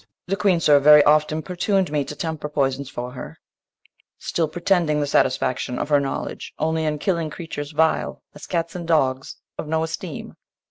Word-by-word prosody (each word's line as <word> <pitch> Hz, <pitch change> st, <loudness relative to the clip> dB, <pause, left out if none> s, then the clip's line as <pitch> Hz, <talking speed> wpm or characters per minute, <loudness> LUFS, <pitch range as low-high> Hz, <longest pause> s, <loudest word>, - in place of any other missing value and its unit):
The 195 Hz, -, -1 dB
Queen, 195 Hz, -4 st, +2 dB
sir, 150 Hz, -3 st, +5 dB
very 150 Hz, +1 st, +8 dB
oft 150 Hz, +1 st, +4 dB
importun'd 180 Hz, +2 st, -1 dB
me 150 Hz, -1 st, +1 dB
To 150 Hz, -, -7 dB
temper 160 Hz, -1 st, -4 dB
poisons 135 Hz, -2 st, -1 dB
for 125 Hz, -1 st, -6 dB
her; 130 Hz, -, -9 dB, 0.8 s
still 165 Hz, -2 st, -1 dB
pretending 170 Hz, -2 st, +1 dB
The 145 Hz, -, +1 dB
satisfaction 130 Hz, -2 st, 0 dB
of -, -, -3 dB
her 145 Hz, -1 st, +5 dB
knowledge 140 Hz, -1 st, -5 dB
only 160 Hz, +1 st, 0 dB
In 150 Hz, -1 st, -1 dB
killing 170 Hz, -1 st, -1 dB
creatures 150 Hz, -2 st, -6 dB
vile, 160 Hz, +1 st, 0 dB
as -, -, -11 dB
cats 170 Hz, -2 st, -2 dB
and 175 Hz, -2 st, -6 dB
dogs, 135 Hz, -5 st, +1 dB, 0.2 s
Of -, -, -4 dB
no 160 Hz, +1 st, 0 dB
esteem. 160 Hz, 0 st, -6 dB
155 Hz, 175 wpm, -22 LUFS, 145-165 Hz, 0.8 s, very